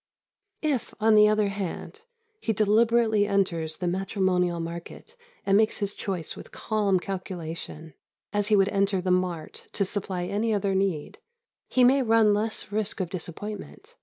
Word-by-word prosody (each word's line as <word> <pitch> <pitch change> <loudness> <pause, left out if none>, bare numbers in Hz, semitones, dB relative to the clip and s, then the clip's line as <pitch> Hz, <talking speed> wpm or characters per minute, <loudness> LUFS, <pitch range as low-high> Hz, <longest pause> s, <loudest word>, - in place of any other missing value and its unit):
If, 285 -6 -1
on 220 +1 +4
the 210 0 +7
other 210 -1 +2
hand, 200 - -5 0.4
he 225 - -1
deliberately 220 0 +3
enters 170 -6 0
the 180 - -3
matrimonial 180 -2 0
market 170 - -7 0.3
and 195 - +3
makes 215 +1 +3
his 200 -1 0
choice 180 -5 -4
with - - -11
calm 205 -4 0
calculation, 170 -4 -6 0.4
as 205 0 +1
he 215 - +4
would 195 0 +4
enter 195 -1 +1
the 185 0 -1
mart 180 -3 -2
to 200 - 0
supply 190 -2 -3
any 210 +4 0
other 200 -1 0
need, 190 -6 -1 0.5
he 255 - +3
may 265 +3 +5
run 225 -3 +4
less 215 -1 -1
risk 210 0 -1
of 180 -2 -3
disappointment. 210 - -7
200 Hz, 155 wpm, -26 LUFS, 180-215 Hz, 0.5 s, the